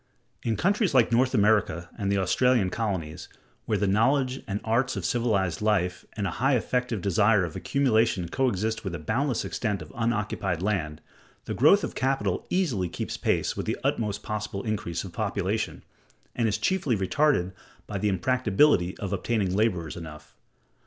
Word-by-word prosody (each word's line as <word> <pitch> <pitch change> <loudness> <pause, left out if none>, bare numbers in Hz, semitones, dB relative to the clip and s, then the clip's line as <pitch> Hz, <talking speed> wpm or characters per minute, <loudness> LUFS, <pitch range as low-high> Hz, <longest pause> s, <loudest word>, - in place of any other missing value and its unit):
In 115 -3 -1
countries 200 - +1
like 120 -2 +4
North 130 +2 +3
America 105 -5 +2
and 100 -3 -2
the 100 - +2
Australian 100 +1 +2
colonies, 90 -7 -3 0.4
where - - 0
the 105 - 0
knowledge 130 +6 +2
and 100 0 -2
arts 120 +4 +1
of 95 -3 -4
civilized 100 -5 0
life 95 -4 0
and 105 - -3
a 95 - -1
high 135 +1 +4
effective 125 -3 -1
desire 100 +1 +3
of 80 - -8
accumulation 115 -9 +1
coexist 110 0 -1
with 95 -4 -4
a - - -3
boundless 120 - -1
extent 105 -4 -2
of 80 -1 -11
unoccupied 105 -6 -1
land, 80 -7 -1 0.4
the - - -3
growth - - +5
of - - -3
capital 135 +1 -1
easily 130 - 0
keeps - - -4
pace - - 0
with - - -4
the - - -1
utmost 105 -3 -1
possible 105 -2 -4
increase 105 -6 -3
of 95 -3 -9
population, 105 +1 -2 0.5
and 115 -2 +1
is 105 -1 0
chiefly 130 - 0
retarded 95 -1 +1 0.3
by 100 -2 -4
the 105 - +1
impracticability 100 - +2
of 100 -1 -4
obtaining 100 -1 0
laborers 90 -7 0
enough. 80 -3 -10
105 Hz, 165 wpm, -26 LUFS, 95-120 Hz, 0.5 s, growth